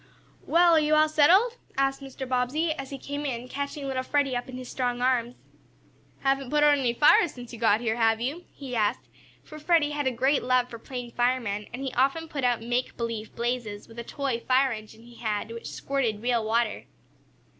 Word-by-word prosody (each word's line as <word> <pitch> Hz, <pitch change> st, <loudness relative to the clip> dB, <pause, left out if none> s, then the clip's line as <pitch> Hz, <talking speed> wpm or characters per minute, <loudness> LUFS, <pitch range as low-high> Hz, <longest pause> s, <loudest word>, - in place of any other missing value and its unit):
"Well, 345 Hz, 0 st, +5 dB
are 320 Hz, -, +6 dB
you 305 Hz, 0 st, +2 dB
all 310 Hz, 0 st, +5 dB
settled?" 370 Hz, +11 st, +4 dB, 0.2 s
asked 270 Hz, 0 st, +1 dB
Mr. 270 Hz, -1 st, -7 dB
Bobbsey, 260 Hz, +6 st, 0 dB
as 275 Hz, -4 st, -5 dB
he 275 Hz, -, -6 dB
came 285 Hz, +2 st, -5 dB
in, 250 Hz, -3 st, -3 dB
catching 280 Hz, +2 st, -4 dB
little 260 Hz, -1 st, -1 dB
Freddie 275 Hz, 0 st, 0 dB
up 245 Hz, +1 st, -4 dB
in 255 Hz, -, -7 dB
his 255 Hz, -1 st, -8 dB
strong 245 Hz, -1 st, -2 dB
arms. 245 Hz, -1 st, +1 dB, 0.9 s
"Haven't 270 Hz, -1 st, 0 dB
put 295 Hz, +1 st, +2 dB
out 295 Hz, -1 st, +6 dB
any 250 Hz, -3 st, +1 dB
fires 295 Hz, +4 st, +5 dB
since 245 Hz, -1 st, -10 dB
you 230 Hz, -, -8 dB
got 225 Hz, -1 st, +3 dB
here, 225 Hz, -1 st, -1 dB
have 225 Hz, -1 st, +3 dB
you?" 285 Hz, +9 st, -3 dB
he 265 Hz, -3 st, -7 dB
asked, 210 Hz, -2 st, 0 dB, 0.4 s
for 305 Hz, -1 st, -11 dB
Freddie 305 Hz, -2 st, +2 dB
had 290 Hz, -2 st, -1 dB
a -, -, +2 dB
great 265 Hz, +4 st, +2 dB
love 250 Hz, 0 st, +1 dB
for 230 Hz, -, -8 dB
playing 245 Hz, -1 st, -7 dB
fireman, 240 Hz, -4 st, 0 dB
and 250 Hz, +3 st, -6 dB
he 265 Hz, -, -3 dB
often 275 Hz, +6 st, +1 dB
put 290 Hz, -4 st, -5 dB
out 245 Hz, -2 st, +1 dB
"make 245 Hz, +2 st, -2 dB
believe" 230 Hz, -2 st, -4 dB
blazes 235 Hz, -3 st, -3 dB
with 230 Hz, +1 st, -11 dB
a -, -, -4 dB
toy 270 Hz, -1 st, -2 dB
fire 265 Hz, +1 st, +4 dB
engine 220 Hz, 0 st, -8 dB
he 240 Hz, 0 st, -15 dB
had, 215 Hz, -1 st, -3 dB
which 230 Hz, 0 st, -7 dB
squirted 235 Hz, -6 st, -2 dB
real 240 Hz, -2 st, +1 dB
water. 225 Hz, 0 st, 0 dB
255 Hz, 210 wpm, -27 LUFS, 235-280 Hz, 0.9 s, are